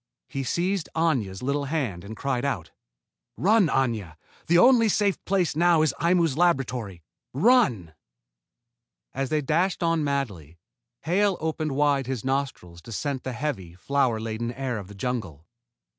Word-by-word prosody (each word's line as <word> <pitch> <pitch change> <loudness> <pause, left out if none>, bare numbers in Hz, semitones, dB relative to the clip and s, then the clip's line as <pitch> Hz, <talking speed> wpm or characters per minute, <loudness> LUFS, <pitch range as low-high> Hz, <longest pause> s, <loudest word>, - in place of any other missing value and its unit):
He 135 - -3
seized 180 +6 -1
Aña's 125 - 0
little 140 +2 -1
hand 130 - -2
and 110 +2 -9
cried 135 -1 -1
out: 100 - -3 0.7
"Run, 205 0 +4
Aña! 115 - -1 0.3
The 170 - +4
only 235 +2 +6
safe 200 -1 +1
place 185 -6 +1
now 170 -1 +4
is 155 -4 +1
Aimu's 170 -4 +2
laboratory. 125 - 0 0.3
Run!" 140 - +3 1.2
As 135 0 -2
they 155 -1 +1
dashed 170 +6 0
on 165 -2 +1
madly, 105 - -3 0.4
Hale 195 +3 +1
opened 155 -2 -2
wide 140 -2 +1
his 130 -4 -4
nostrils 130 -11 -3
to 115 - -12
scent 135 +4 -3
the 130 - -4
heavy, 120 - -4
flower 125 +2 0
laden 115 +1 -3
air 130 -3 -3
of 100 - -9
the 100 - -12
jungle. 95 - -4
135 Hz, 145 wpm, -25 LUFS, 110-165 Hz, 1.2 s, only